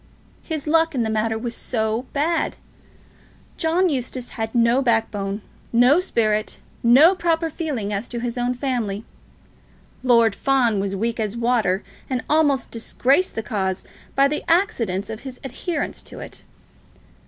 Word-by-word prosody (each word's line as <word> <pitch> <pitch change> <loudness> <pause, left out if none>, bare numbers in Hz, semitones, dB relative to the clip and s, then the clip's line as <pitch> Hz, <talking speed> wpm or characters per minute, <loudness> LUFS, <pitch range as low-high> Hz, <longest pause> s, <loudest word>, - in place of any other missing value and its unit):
His 315 -4 -4
luck 325 0 +2
in 245 - +1
the 220 - -1
matter 220 +1 0
was 230 +1 -4
so 225 +1 -2
bad! 320 +4 0 1.0
John 335 +3 +2
Eustace 255 -4 -3
had 225 0 -4
no 235 +2 +4
backbone, 215 -4 0 0.3
no 245 +7 +5
spirit, 215 - 0 0.2
no 270 +10 +7
proper 330 -3 0
feeling 265 - -3
as 205 +4 -3
to 240 - -5
his 235 0 -3
own 245 0 0
family. 235 -6 -2 1.0
Lord 235 -4 +4
Fawn 245 -4 +2
was 195 0 -1
as - - -2
weak 230 +3 -1
as 215 +1 -2
water, 230 -5 +1 0.3
and 255 -1 -1
almost 295 -3 +2
disgraced 265 +8 +1
the 225 - -2
cause 190 -4 -2 0.3
by 275 +1 +5
the 300 +1 -3
accident 230 - +1
of 220 - -6
his 260 -1 -9
adherence 290 +4 -3
to - - -11
it. - - -9
240 Hz, 150 wpm, -22 LUFS, 220-285 Hz, 1.0 s, no